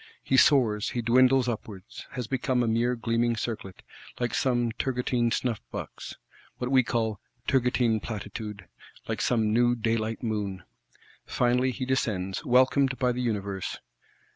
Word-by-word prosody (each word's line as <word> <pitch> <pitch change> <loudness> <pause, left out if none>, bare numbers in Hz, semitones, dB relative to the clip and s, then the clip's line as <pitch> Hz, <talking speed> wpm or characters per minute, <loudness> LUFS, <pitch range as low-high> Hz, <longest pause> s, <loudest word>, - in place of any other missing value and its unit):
He 135 - +1
soars, 120 -7 +4
he 120 - -3
dwindles 130 +2 +4
upwards; 110 -2 -6
has 125 -2 -3
become 125 +1 0
a - - 0
mere 120 +2 +1
gleaming 115 0 0
circlet,—like 115 +2 -6
some 120 -3 +1
Turgotine 125 0 0
snuff 115 -1 -1
box, - - -7 0.4
what 125 +1 -3
we 130 -1 +6
call 115 -4 -1 0.3
"Turgotine 125 -3 +2
Platitude;" 105 -2 -6 0.4
like - - -2
some 110 -3 +1
new 120 +1 +3
daylight 115 0 -1
Moon! 100 -5 -3 0.6
Finally 125 +1 +2
he 130 +1 -3
descends; 100 -8 -1
welcomed 130 +1 +3
by 125 -1 +2
the 125 +1 -3
universe. 100 -5 -3
120 Hz, 135 wpm, -27 LUFS, 110-125 Hz, 0.6 s, we